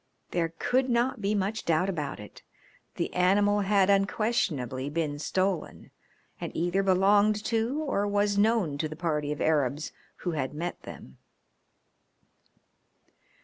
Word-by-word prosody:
There 165 -1 -1
could 255 +1 +1
not 240 0 +1
be 205 +1 0
much 205 +2 -1
doubt 170 +3 +1
about 150 - -3
it. 105 - -12 0.5
The - - -3
animal 205 +3 +3
had 200 -1 +3
unquestionably 195 - 0
been 150 -2 -2
stolen, 185 +1 -2 0.5
and - - -5
either 175 +3 +1
belonged 205 +2 +3
to 230 +4 0
or 205 -8 0
was 205 0 +1
known 200 -8 +2
to 155 - -1
the 155 - -7
party 150 -3 -1
of 150 - -4
Arabs 145 -1 0 0.3
who 175 - +1
had 145 -3 -3
met 175 +3 -4
them. 65 - -11
190 Hz, 135 wpm, -28 LUFS, 155-205 Hz, 0.5 s, animal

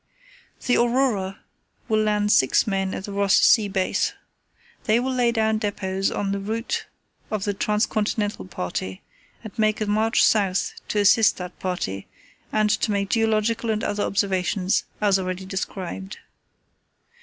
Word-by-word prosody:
"The 250 - +3
Aurora 235 -6 +1 0.5
will 215 -1 +2
land 210 -1 +1
six 130 - +4
men 195 -3 -1
at - - -5
the 205 - -6
Ross 200 0 +2
Sea 215 -3 +5
base. 190 -2 0 0.7
They 220 +2 +3
will 260 +1 -1
lay 245 -2 +2
down 220 -1 +1
depots 195 -2 -1
on 200 -1 -2
the 200 - -1
route 225 +4 -3 0.4
of 215 -3 -2
the 205 - -1
Trans 210 +2 +1
continental 210 - -2
party, 95 +1 -5 0.4
and 220 - -9
make 215 -1 +2
a 215 - -1
march 215 +2 +2
south 195 -3 +2 0.2
to - - -2
assist 210 +2 +5
that 180 -1 -8
party, 100 - -3 0.4
and 215 -1 +2
to 215 - 0
make 200 -1 -1
geological 225 +1 +1
and 215 -1 0
other 205 0 -1
observations 195 -1 0
as 200 -2 +3
already 185 0 -4
described. 185 - -5
205 Hz, 150 wpm, -23 LUFS, 190-220 Hz, 0.7 s, Sea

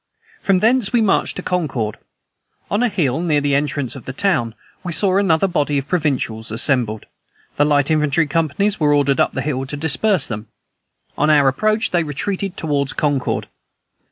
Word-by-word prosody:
From 190 -2 +2
thence 230 -2 +2
we 240 - +3
marched 215 -3 +1
to 180 - -6
Concord. 135 -12 -2 0.7
On 205 - +1
a 245 - +2
hill, 160 - 0
near 155 -4 +1
the 145 -1 0
entrance 140 -2 -1
of 135 - -10
the 130 - -6
town, 125 - 0 0.3
we 180 - -4
saw 190 +2 +2
another 195 -2 +2
body 150 -5 0
of 135 0 -3
provincials 135 -9 -1
assembled: 115 -1 0 0.5
the 145 - +4
light 145 0 +2
infantry 155 +1 +2
companies 165 +7 0
were 145 -2 +3
ordered 140 -2 +2
up - - +2
the 130 - -3
hill 135 -2 -2
to 145 - -5
disperse 160 +6 +1
them; 110 -1 -6 0.7
on 150 - +3
our 145 -3 +5
approach, 215 +11 +1
they 175 - +2
retreated 185 +5 -3
toward 145 -3 -1
Concord. 145 -4 -1
150 Hz, 175 wpm, -19 LUFS, 135-185 Hz, 0.7 s, our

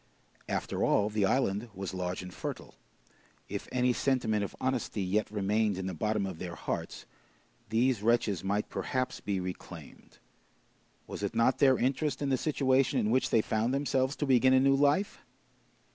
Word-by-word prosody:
After - - -2
all, 105 +1 +2
the 105 -2 +2
island 110 -2 0
was 95 0 -5
large 90 0 -3
and 90 0 -9
fertile. - - -6 0.7
If - - -5
any 125 0 +2
sentiment 115 -6 0
of 100 - -6
honesty 130 -5 -1
yet 100 +3 0
remained 105 0 0
in 95 - -4
the 95 - -3
bottom 105 +4 -1
of 95 -4 -6
their 85 -2 -5
hearts, - - -5 0.6
these 115 0 +2
wretches 110 -4 +1
might 100 +2 -1
perhaps 130 0 -2
be 100 -2 -2
reclaimed. 90 -4 -9 0.9
Was - - -7
it 105 +3 -3
not 115 +3 +3
their 135 -3 +5
interest 140 +4 0
in 145 - -1
the 130 - +2
situation 135 -3 +2
in 110 -2 +1
which 130 +2 +2
they 110 - +3
found 115 +4 0
themselves 135 0 0
to 145 - -2
begin 130 -1 +4
a 130 - +6
new 135 +1 +4
life? 145 +8 +1
115 Hz, 170 wpm, -30 LUFS, 100-130 Hz, 0.9 s, a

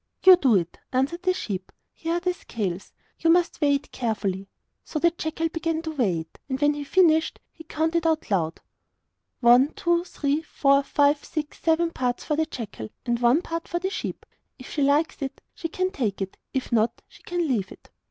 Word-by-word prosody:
'You 375 -1 +10
do 260 -9 +3
it,' 175 -3 -1
answered 275 +7 0
the 370 - +2
sheep; 190 - -4 0.2
'here 330 0 -3
are - - +1
the 360 0 0
scales. 195 - -4 0.3
You 330 - +2
must 345 0 +3
weigh 285 -1 +4
it 280 - -5
carefully.' 200 -5 -2 0.3
So - - -5
the 340 +2 +4
jackal 325 0 -2
began 325 0 -2
to 320 - -3
weigh 205 - 0
it, 160 - -15
and 265 0 -2
when 295 0 +3
he 295 - -6
had 285 - -7
finished, 320 -3 +3
he 325 - -14
counted 325 +2 0
out 315 -7 0
loud: 165 -4 0 0.8
'One, 245 +3 +7
two, 345 0 +1
three, 295 -4 -1
four, 275 -3 +3
five, 285 +1 +2
six, 300 -1 -5
seven 330 +1 +2
parts 250 -5 -2
for 300 - 0
the 315 +1 0
jackal, 210 - -7 0.2
and 240 -1 0
one 245 +8 +4
part 330 0 -4
for 345 - -2
the 375 +2 -2
sheep. 440 - -5 0.3
If 255 - -11
she 295 - -1
likes 290 +3 +2
it 275 0 -4
she 330 - -4
can 370 +3 -1
take 230 - -2
it, 195 -1 -4 0.2
if 265 -1 -3
not, 230 0 +1
she - - -19
can 350 -2 -2
leave 220 -9 -1
it. - - -15
290 Hz, 205 wpm, -25 LUFS, 240-330 Hz, 0.8 s, You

